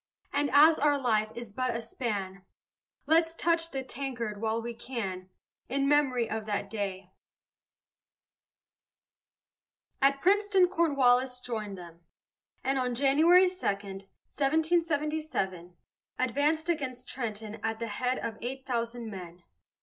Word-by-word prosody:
And 285 0 +1
as 310 +3 +6
our 290 -1 +3
life 220 -5 +1
is 235 -3 -8
but 255 +1 -1
a - - -4
span, 205 -5 -4 0.6
Let's 325 +2 +3
touch 330 0 +1
the 270 -3 -4
tankard 240 -6 -4
while 225 0 0
we 235 +1 -5
can, 195 -7 -5 0.4
In 275 +2 +1
memory 270 -5 +3
of 220 0 -4
that 205 -1 -2
day. 195 -3 -4 2.9
At 275 0 +4
Princeton 390 +1 +4
Cornwallis 265 -7 +2
joined 215 -5 -5
them, 170 -1 -12 0.6
and 270 0 +1
on 250 -1 -1
January 315 +8 +5
2, 360 - -3
1777, 280 - -1 0.4
advanced 290 +6 +1
against 265 -7 -2
Trenton 220 -3 -5
at 225 0 -2
the 230 - -3
head 250 +4 -1
of 220 -1 -5
eight 265 +2 -5
thousand 235 -1 -3
men. 175 -2 -9
250 Hz, 120 wpm, -29 LUFS, 215-290 Hz, 2.9 s, as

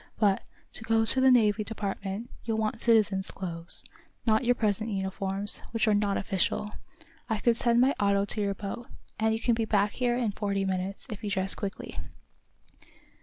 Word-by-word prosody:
"But, 205 -3 +3 0.3
to - - -3
go 225 0 +2
to 260 +4 +3
the 265 - +6
Navy 215 -4 +4
Department, 205 +1 -4
you'll 225 -1 -1
want 220 +1 -1
citizen's 210 -4 +3
clothes 170 -3 -4 0.4
not 220 +1 +3
your 245 0 +3
present 215 -1 0
uniforms, 195 0 +1
which 225 -1 0
are 215 - +4
not 205 -1 +1
official. 200 +2 -1 0.6
I 220 - +1
can 235 +3 +3
send 235 0 +2
my 265 +3 +4
auto 200 -1 +2
to 210 - -2
your 200 -1 0
boat, 210 +4 -6 0.3
and 220 0 +2
you 220 - 0
can 235 +1 +2
be 225 0 0
back 205 -1 +2
here 245 0 0
in 235 -4 0
forty 200 -1 -1
minutes, 190 +1 -2
if 210 - -7
you 210 - -2
dress 195 -1 +1
quickly." 200 -2 -5
210 Hz, 180 wpm, -28 LUFS, 195-225 Hz, 0.6 s, the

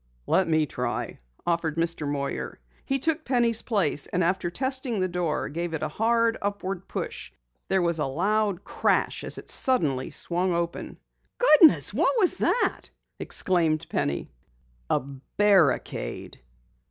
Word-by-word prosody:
"Let 190 - +2
me 155 -1 +2
try," 120 -3 -4 0.3
offered 170 -2 -1
Mr. 165 -2 -1
Moyer. 140 - -4 0.3
He 270 - 0
took 315 +3 -1
Penny's 240 -4 +2
place, 185 -10 0
and 180 0 -1
after 175 0 0
testing 260 +1 -1
the 185 - +1
door, 175 -3 -2
gave 170 +1 -4
it 155 - -4
a - - 0
hard 230 +1 +1
upward 195 -2 -4
push. - - -6 0.4
There 190 -2 +1
was 170 -2 +1
a 150 - 0
loud 200 +6 0
crash - - 0
as - - -3
it - - -10
suddenly 150 - +2
swung 175 +1 -2
open. 170 0 -4 0.4
"Goodness! 325 - +6
What - - +1
was 380 -6 +2
that?" - - 0 0.3
exclaimed 165 -4 0
Penny. 70 0 -2 0.6
"A - - +2
barricade. 145 +5 0
180 Hz, 140 wpm, -26 LUFS, 155-225 Hz, 0.6 s, Goodness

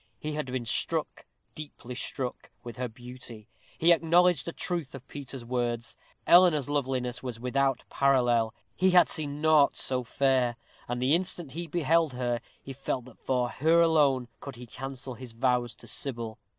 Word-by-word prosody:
He 155 - -4
had 150 -2 -3
been 125 -1 -3
struck, 115 - -2 0.3
deeply 145 -5 -8
struck, 125 0 -4
with 120 -2 -8
her 125 0 -2
beauty. 120 -2 -11 0.3
He 170 +2 +5
acknowledged 170 -1 +3
the 170 - -3
truth 170 -6 -3
of 135 -1 -11
Peter's 135 -3 -8
words. 120 -1 -2 0.3
Eleanor's 170 -6 +6
loveliness 130 -4 -1
was 125 -3 -6
without 135 +1 0
parallel. 120 -5 +2 0.2
He 185 +1 +3
had 180 -1 +6
seen 150 -2 -4
naught 155 -2 +4
so 130 -1 -1
fair, 130 -1 +1 0.3
and 120 0 -2
the 130 +3 +2
instant 175 -4 -1
he 170 +3 -5
beheld 165 -2 +2
her, 120 -1 -1 0.2
he 135 - -7
felt 130 -2 -3
that 130 - -15
for 125 -2 0
her 160 +6 +3
alone 145 -7 +3
could 140 -2 -8
he 125 +1 -9
cancel 135 +1 -7
his 120 -1 -10
vows 120 -1 0
to - - -14
Sybil. 115 -5 -4
130 Hz, 165 wpm, -28 LUFS, 125-150 Hz, 0.3 s, Eleanor's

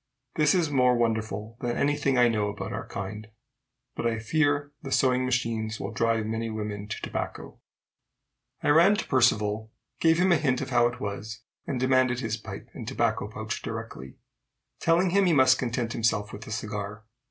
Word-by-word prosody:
This 150 +2 +3
is 165 -5 +1
more 125 -3 +4
wonderful 110 -1 -2
than 120 -1 -1
any 145 +1 +2
thing 140 -3 +1
I 120 -1 +6
know 105 -3 0
about 100 - -5
our - - -5
kind. 105 +2 -6 0.7
But 120 - -1
I 115 -1 0
fear 145 +4 +1
the 135 - -7
sewing 130 -1 +3
machines 115 -3 -1
will - - -4
drive 115 -1 +1
many 115 +1 -2
women 105 -2 -4
to - - -5
tobacco. - - -5 1.0
I - - +2
ran 170 +7 +6
to 215 - -3
Percivale, 110 -4 +2 0.3
gave 165 0 +4
him 185 +1 +3
a 170 - +5
hint 135 -4 +1
of - - -5
how 120 -1 +4
it 120 0 -6
was, 105 +1 -5 0.3
and 130 - -2
demanded 130 -1 +2
his 115 -4 -2
pipe 110 - -9
and - - -8
tobacco - - 0
pouch - - -5
directly, 65 0 -7 0.6
telling 170 +2 +3
him 200 +1 +4
he 170 - +4
must 130 -2 +5
content 120 -2 -2
himself 110 -2 0
with 105 +2 -9
a - - -7
cigar. 105 -1 -4
120 Hz, 185 wpm, -27 LUFS, 110-135 Hz, 1.0 s, I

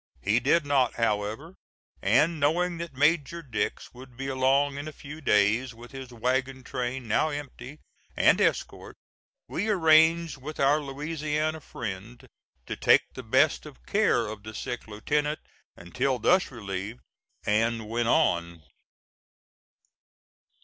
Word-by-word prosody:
He 105 +4 +3
did 145 +6 +2
not, 135 -4 +2
however, 110 - -2 0.5
and 150 - +3
knowing 170 +4 +1
that 170 -5 -6
Major 155 +3 +1
Dix 110 -8 -3
would 125 -1 -14
be 135 - -5
along 135 +2 +2
in 145 - -6
a - - -5
few 150 +1 -10
days, 115 +1 +2
with 120 +1 -13
his 130 -2 -9
wagon 130 +2 -1
train, 125 -1 -4
now 115 +8 +2
empty, 145 -1 -7 0.4
and - - +4
escort, - - -1 0.5
we 210 +5 -2
arranged 160 -3 +4
with 150 +4 -8
our 140 +2 +4
Louisiana 150 +2 -3
friend 115 -1 -7 0.4
to - - -4
take - - +3
the - - -7
best - - +2
of 60 0 -15
care 120 - +2
of 105 -1 -7
the 110 +1 -9
sick 120 -2 -5
lieutenant 150 +8 -1 0.4
until 125 +10 -1
thus 180 - +3
relieved, 105 -1 -6 0.4
and 110 +1 +1
went 115 +1 -1
on. 85 -6 +1
130 Hz, 135 wpm, -27 LUFS, 115-150 Hz, 0.5 s, and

